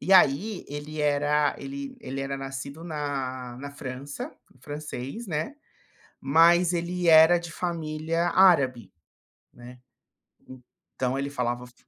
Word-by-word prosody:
e 195 - 0
aí 185 +4 +4
ele 145 +1 -6
era, 145 0 +2
ele 275 -1 -7
ele 135 - -5
era 135 0 -3
nascido 135 +3 -7
na 135 -6 -4
na 140 +2 -7
França, 140 0 -6 0.3
francês 145 - -6
né, 175 - -3 0.6
mas 170 +5 +5
ele 175 +1 -2
era 160 +2 +8
de 170 -1 -8
família 165 0 -2
árabe, 130 - +4 0.6
né, 125 +1 -13 1.2
então 130 +1 -1
ele 140 +1 -2
falava 125 -2 -2
o - - -11
f 125 - -19
150 Hz, 125 wpm, -26 LUFS, 135-170 Hz, 1.2 s, era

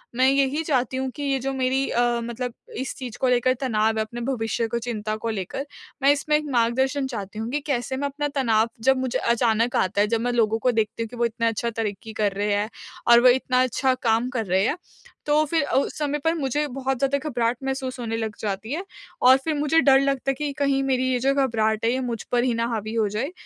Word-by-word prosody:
मैं 255 +1 +4
यही 275 +2 +2
चाहती 260 -4 0
हूँ 265 0 -1
कि 290 - -5
ये 275 -1 +1
जो 270 +2 -2
मेरी 265 +1 0
अ, 240 - +1 0.2
मतलब 240 +1 -4 0.2
इस 265 - -3
चीज़ 250 -4 -7
को 260 - +3
लेकर 250 +1 +3
तनाव 220 -3 +1
है - - +2
अपने 235 +2 -7
भविष्य 230 -2 -1
को 235 +1 -2
चिंता 215 -2 -3
को 230 +1 -4
लेकर, 220 +6 -4 0.4
मैं 280 - +7
इसमें 300 +1 0
एक 305 - -4
मार्गदर्शन 265 +4 +1
चाहती 210 -4 -6
हूँ 225 +1 -3
कि 295 - 0
कैसे 260 -1 -1
मैं 285 +1 -1
अपना 290 +1 -3
तनाव 230 -4 +2
जब 265 +1 +4
मुझे 255 -1 -1
अचानक 235 0 +1
आता 200 +2 +1
है, 210 - +3
जब 225 +1 0
मैं 245 +1 0
लोगों 225 -1 +2
को 250 - +2
देखती 225 0 -1
हूँ 225 - -7
कि 245 - -10
वो 235 - +2
इतना 230 0 -1
अच्छा 230 +1 -1
तरक्की 220 -1 -4
कर 210 -2 +1
रहे 205 +1 0
हैं 205 +1 0 0.4
और 235 0 +8
वो 250 - +7
इतना 255 0 +2
अच्छा 260 +1 +1
काम 230 +1 +2
कर 240 -4 -2
रहे 190 +1 +2
हैं। 300 - 0 0.5
तो 300 +1 +3
फिर 320 0 +1
उ - - +6
उस - - -3
समय 295 0 -1
पर 325 +1 +3
मुझे 295 0 -1
बहुत 270 0 -2
ज़्यादा 275 +1 +2
घबराहट 240 -2 0
महसूस 265 -1 -3
होने 225 -2 -3
लग 220 -2 -3
जाती 210 +3 -3
है, 355 +5 -3 0.4
और 260 +1 +7
फिर 320 - +1
मुझे 300 +2 +3
डर 270 -1 +6
लगता 275 -1 0
है - - -4
कि 295 +1 -3
कहीं 275 -1 +2
मेरी 260 -1 +1
ये 250 - +1
जो 270 +3 +2
घबराहट 225 -5 +1
है 230 - +3
ये 255 - 0
मुझ 230 - -4
पर 240 0 +3
ही 250 - +1
ना 230 0 0
हावी 220 0 -3
हो 220 -2 +2
जाए, 240 - -3
245 Hz, 245 wpm, -24 LUFS, 225-270 Hz, 0.5 s, और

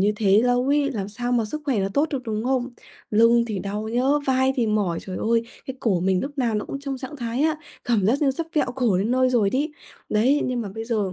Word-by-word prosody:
như 205 +2 +3
thế 205 0 +4
lâu 245 +1 +2
ấy 285 0 +2
làm 200 -4 -3
sao 245 +4 -3
mà 235 -2 +2
sức 300 +8 -5
khỏe 270 -7 0
nó 195 - 0
tốt 300 +3 +2
được, 270 -3 -3
đúng 220 -1 -3
không? 255 -1 0 0.4
Lưng 230 +2 +5
thì 215 -4 -3
đau 205 +3 -4
nhá, 240 +2 0 0.2
vai 260 0 +3
thì 240 -3 +1
mỏi, 205 -6 0
trời 185 -1 -6
ơi, 230 +1 +1 0.2
cái 265 0 -6
cổ 195 -7 +1
mình 185 0 +1
lúc 285 +1 -6
nào 235 -4 +1
nó 210 - -1
cũng 275 - -6
trong 275 -2 -4
trạng 260 +3 -7
thái 240 +1 -2
á 315 0 +2 0.3
cảm 220 -6 +1
giác 265 +8 +2
như 275 - +4
sắp 315 +5 -4
vẹo 300 - +2
cổ 240 -8 +2
đến 205 +5 0
nơi 255 0 +3
rồi 220 -5 +2
đấy. 290 +6 -1 0.4
Đấy, 250 +8 +3
nhưng 250 -1 -1
mà 205 - -5
bây 225 - -5
giờ 215 -5 -1
235 Hz, 265 wpm, -23 LUFS, 210-265 Hz, 0.4 s, Lưng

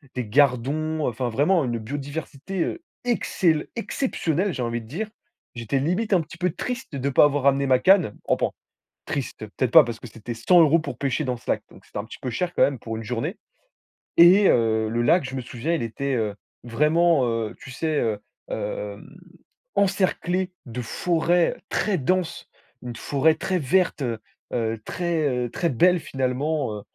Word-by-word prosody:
des 125 -2 -2
gardons, 145 +5 +1
enfin 120 +1 -2
vraiment 150 +9 +2
une 120 -2 -2
biodiversité, 145 - -5
heu, 345 - -4 0.2
excel 175 -9 +1
exceptionnelle, 200 - -1
j'ai 130 - -4
envie 120 0 -2
de 110 - -14
dire. 200 - -4 0.5
J'étais 120 +3 -1
limite 180 +10 0
un 180 - +4
petit 160 +2 -11
peu 180 0 0
triste 240 - -5
de 140 +1 -1
pas 135 - +5
avoir 145 -1 +1
ramené 140 0 +3
ma 130 -1 +4
canne, 180 - +4
enfin, - - +1 0.5
«triste», 130 -5 -4
peut-être 130 -3 +1
pas, 160 - +9
parce 120 -3 -6
que - - -9
c'était 115 +1 -7
100 145 +11 +4
euros 165 0 +6
pour 155 - -6
pêcher 140 +2 -1
dans 125 -3 -2
ce 120 - -13
lac, - - 0
donc - - -17
c'était - - -6
un - - -3
petit 110 - -10
peu 130 - -4
cher 180 +6 -2
quand - - +5
même 140 -3 +1
pour 115 0 -5
une 115 - -6
journée, 125 - -3 0.8
et 185 +4 +8
heu, 110 -1 +2
le 115 +2 0
lac, 170 +8 +4
je 130 - -6
me 130 - -2
souviens, 125 +6 -3
il 160 - -2
était, 135 +4 -2
heu, 110 -3 -1 0.3
vraiment, 150 +5 +3
heu, 115 -2 -2
tu - - -11
sais, 155 +3 -1
heu, 110 -3 0 0.3
hem, - - -5 0.6
encerclé 185 -1 +1
de 125 0 -5
forêts 170 +7 +1
très 205 -3 0
denses. 180 +4 -1 0.4
Une 120 -1 -6
forêt 145 +6 +2
très 185 +3 -1
verte, 175 +3 +1
heu 115 -4 -2 0.3
heu, 115 -2 -1
très, 170 -4 -1
heu, 125 -2 -1
très 170 - 0
belle 175 +7 +4
finalement, 135 -3 -2
heu, - - -10
140 Hz, 185 wpm, -24 LUFS, 120-175 Hz, 0.8 s, pas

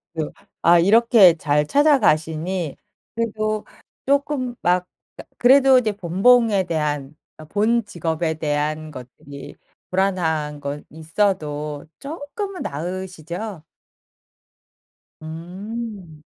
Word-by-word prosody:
그 155 -2 -3 0.3
아 170 +1 +6
이렇게 205 0 +6
잘 150 0 +1
찾아가시니 175 - +2 0.4
그래도 215 -2 -2 0.4
쪼끔 275 -3 0
막 180 +1 +2 0.3
그니까 - - -12
그래도 265 +1 +6
이제 215 -4 -1
본봉에 200 +3 +3
대한 150 -4 -2 0.2
어 155 - -11
본 215 +7 +1
직업에 165 -3 -2
대한 155 0 -2
것들이 140 +2 -11 0.3
불안한 160 -6 0
건 145 +1 -5
있어도 155 -3 -2
쪼끔은 330 +7 -6
나으시죠? 180 +3 -6 1.6
음. 180 +1 -7
180 Hz, 200 characters per minute, -21 LUFS, 155-225 Hz, 1.6 s, 아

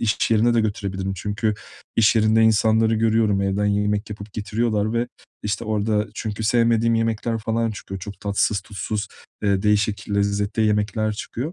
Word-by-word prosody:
iş 110 -1 +1
yerine 115 +2 +3
de 115 - +4
götürebilirim. 100 -3 -2
Çünkü 105 +3 -1 0.4
iş 115 0 +4
yerinde 110 +1 +4
insanları 110 0 +3
görüyorum, 110 -2 +2
evden 100 +1 0
yemek 105 +1 0
yapıp 100 0 -8
getiriyorlar 110 0 -1
ve, 120 +1 0 0.3
işte, 105 +1 -2
orada 105 0 0
çünkü 110 0 -4
sevmediğim 115 0 +3
yemekler 115 0 0
falan 115 +1 -1
çıkıyor. 95 -2 -7
Çok 100 +1 -8
tatsız 100 -1 +1
tuzsuz, 100 +1 -4 0.3
eee, 100 -1 +1
değişik 105 0 +1
lezzette 100 +2 0
yemekler 105 0 +1
çıkıyor. 125 +8 -5
105 Hz, 150 wpm, -22 LUFS, 100-115 Hz, 0.4 s, de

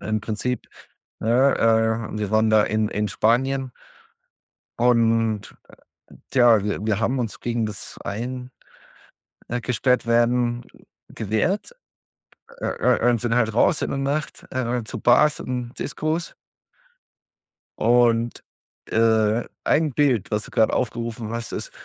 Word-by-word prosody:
im 110 -1 -2
Prinzip. 115 +4 -3 0.5
Ne, 125 +5 +3
äh, 110 -1 +1
wir 105 -1 -3
waren 110 0 +3
da 110 -1 +5
in, 110 0 0
in 105 0 -2
Spanien 130 +4 +1 1.1
und, 115 -3 +2
äh, - - -16 0.6
tja, 120 -5 +5
wir, 105 0 -3
wir 110 -1 0
haben 125 +3 0
uns 115 -3 -4
gegen 120 -2 -1
das 105 -2 -7
ein 125 +4 -5 1.0
äh, 120 +1 -2
gesperrt 125 +1 +1
werden 120 +1 +2 0.5
gewehrt, 110 - -1 0.9
äh, - - -2
äh, 120 - +2
und 120 -3 +1
sind 120 -1 0
halt 110 -3 +1
raus 140 - +3
in - - -1
der 140 - -2
Nacht, 145 +3 -3
äh, 125 -2 -1
zu - - -6
Bars 150 +5 +4
und 125 -1 -4
Discos 160 +2 -3 1.4
und, 120 0 +2 0.5
äh, 110 0 +2 0.2
ein 155 -1 +2
Bild, 125 -7 +1
was 105 +1 -1
du - - -11
gerade 110 - +2
aufgerufen 115 -2 -3
hast, 115 0 -5
ist - - -5
115 Hz, 130 wpm, -23 LUFS, 110-125 Hz, 1.4 s, da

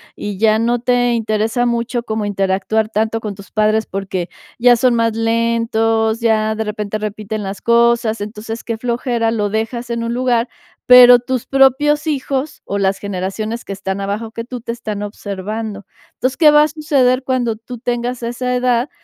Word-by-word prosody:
y 205 -2 -5
ya 215 +1 +3
no 240 +2 +1
te 245 0 +2
interesa 225 +1 0
mucho 235 0 -1
como 220 -2 -3
interactuar 195 +2 0
tanto 220 +1 -1
con 210 -2 -5
tus 200 0 -14
padres 215 0 +2
porque 190 -2 -4 0.3
ya 245 +1 +6
son 245 +1 +2
más 230 -1 +1
lentos, 225 -1 +1
ya 220 -2 +1
de 220 - -2
repente 210 0 -3
repiten 215 0 -4
las 195 0 -6
cosas, 235 -1 +2
entonces, 215 +2 -6
qué 230 -1 -3
flojera, 235 -1 -1
lo 210 -3 -1
dejas 225 +3 -3
en 235 0 -2
un 230 - -2
lugar, 245 -1 +1 0.4
pero 245 -1 +9
tus 250 0 -3
propios 280 +3 +3
hijos, 280 -1 -2
o 200 - -3
las 195 -1 +1
generaciones 200 +4 -4
que 200 - -5
están 195 0 -4
abajo 205 +3 -3
que 230 0 -6
tú, 250 0 -7
te 230 - -4
están 215 -3 -5
observando, 205 0 -5 0.3
entonces, 255 +1 -2
¿qué 310 -3 +6
va 295 0 +6
a - - +2
suceder 275 -4 +1
cuando 245 -4 0
tú 235 +2 -9
tengas 240 +1 -3
esa 250 +2 -2
edad?, 250 +1 +1
230 Hz, 175 wpm, -17 LUFS, 215-245 Hz, 0.4 s, pero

